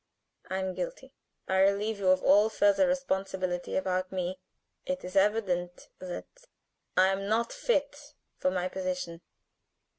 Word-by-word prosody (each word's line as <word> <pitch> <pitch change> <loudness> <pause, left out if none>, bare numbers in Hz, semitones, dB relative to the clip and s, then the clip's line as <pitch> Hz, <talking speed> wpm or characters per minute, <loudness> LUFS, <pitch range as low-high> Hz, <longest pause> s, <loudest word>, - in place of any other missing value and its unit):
I 190 - -1
am 190 -1 -2
guilty. - - -6 0.3
I 190 0 +2
relieve 200 +2 +2
you 195 - -1
of 185 0 +4
all 205 +3 +6
further 210 +5 +3
responsibility 190 -9 -1
about 185 0 -1
me. 185 0 -3 0.4
It 275 0 -3
is 185 +2 -8
evident 190 -4 +1
that 345 - -8 0.5
I 185 +1 +6
am 195 +1 -1
not 230 +2 +1
fit 290 - -1 0.2
for 185 - +2
my 185 -1 -1
position. 180 -2 -4
190 Hz, 140 wpm, -29 LUFS, 185-220 Hz, 0.5 s, all